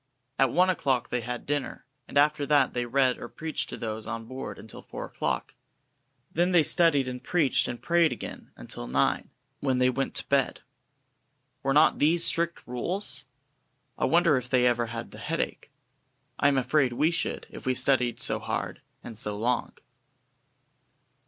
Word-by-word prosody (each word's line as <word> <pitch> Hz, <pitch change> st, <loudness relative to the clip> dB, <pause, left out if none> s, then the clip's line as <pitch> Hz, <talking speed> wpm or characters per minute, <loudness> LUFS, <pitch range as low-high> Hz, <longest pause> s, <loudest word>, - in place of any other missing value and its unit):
At 135 Hz, -2 st, +4 dB
one 185 Hz, +1 st, +4 dB
o'clock 130 Hz, -8 st, 0 dB
they 125 Hz, -, 0 dB
had 120 Hz, +1 st, -5 dB
dinner, 145 Hz, -1 st, -3 dB, 0.2 s
and -, -, -3 dB
after 145 Hz, 0 st, +3 dB
that 145 Hz, -3 st, +3 dB
they 120 Hz, -1 st, -2 dB
read 130 Hz, 0 st, +2 dB
or -, -, -7 dB
preached 155 Hz, -4 st, -4 dB
to -, -, -6 dB
those 110 Hz, -1 st, -5 dB
on 115 Hz, 0 st, -4 dB
board 120 Hz, -4 st, -6 dB
until 110 Hz, -, -10 dB
four -, -, -7 dB
o'clock. -, -, -3 dB, 0.8 s
Then 175 Hz, +3 st, +2 dB
they 170 Hz, -3 st, +6 dB
studied 150 Hz, -6 st, +3 dB
and 125 Hz, -1 st, -5 dB
preached 160 Hz, -7 st, +2 dB
and 120 Hz, -, -5 dB
prayed 170 Hz, -2 st, +3 dB
again -, -, -7 dB
until -, -, -7 dB
nine, 65 Hz, +3 st, +1 dB, 0.3 s
when 130 Hz, -2 st, +1 dB
they 125 Hz, 0 st, +3 dB
went 135 Hz, +2 st, -2 dB
to -, -, -1 dB
bed. 140 Hz, -2 st, +1 dB, 1.0 s
Were 135 Hz, -, 0 dB
not 150 Hz, -, +5 dB
these 165 Hz, +3 st, +4 dB
strict 170 Hz, 0 st, 0 dB
rules? 135 Hz, +2 st, -3 dB, 0.7 s
I -, -, 0 dB
wonder 170 Hz, -4 st, +4 dB
if 125 Hz, -1 st, -5 dB
they 125 Hz, -1 st, +3 dB
ever 120 Hz, -1 st, +2 dB
had -, -, -6 dB
the -, -, -10 dB
headache? -, -, -3 dB, 0.7 s
I 140 Hz, -, +4 dB
am 140 Hz, -1 st, +3 dB
afraid 130 Hz, 0 st, +2 dB
we 155 Hz, +7 st, +2 dB
should, 170 Hz, -, -2 dB
if -, -, -9 dB
we 130 Hz, -, +2 dB
studied 125 Hz, -2 st, +2 dB
so -, -, +1 dB
hard -, -, -4 dB, 0.2 s
and 115 Hz, -, -8 dB
so 105 Hz, -1 st, -3 dB
long. 120 Hz, +3 st, 0 dB
130 Hz, 170 wpm, -27 LUFS, 120-150 Hz, 1.0 s, they